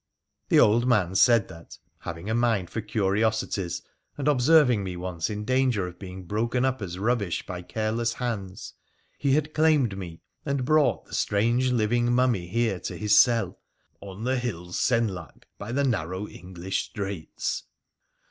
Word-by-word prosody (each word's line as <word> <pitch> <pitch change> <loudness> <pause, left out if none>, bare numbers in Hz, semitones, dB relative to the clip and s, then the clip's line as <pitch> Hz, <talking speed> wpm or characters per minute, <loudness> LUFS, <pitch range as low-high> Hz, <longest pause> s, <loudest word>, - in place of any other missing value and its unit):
The - - +5
old 115 +4 +4
man 100 -7 +2
said 115 +2 +5
that, 85 -2 -12 0.2
having 85 +3 -7
a 110 - 0
mind 115 -6 +1
for 110 - -3
curiosities, 105 -3 -1 0.3
and 145 0 -2
observing 130 -5 +4
me 90 -2 -5
once 90 -2 -3
in 105 0 -4
danger 130 -5 +1
of 90 0 -11
being 95 -1 -8
broken 115 +7 0
up 130 -2 -1
as 90 -3 -5
rubbish 105 -3 -1
by 90 -1 -6
careless 110 +5 -1
hands, 105 -5 -5 0.5
he 140 -2 +2
had 150 +1 0
claimed 150 -9 +3
me, 85 -4 -8 0.2
and 140 -2 -1
brought 155 0 +2
the - - -16
strange 120 +5 +1
living 120 +1 +1
mummy 120 -8 +2
here 110 -1 0
to - - -5
his 105 -1 +3
cell 115 +2 +4 0.2
' - - -44
on 100 +2 -8
the 130 +1 +1
hill 90 -8 -5
Senlac, 105 -9 -1 0.2
by 105 - -6
the 140 +3 +1
narrow 95 - -1
English 90 +1 -5
straits.' 100 -6 -4
110 Hz, 160 wpm, -26 LUFS, 95-125 Hz, 0.5 s, The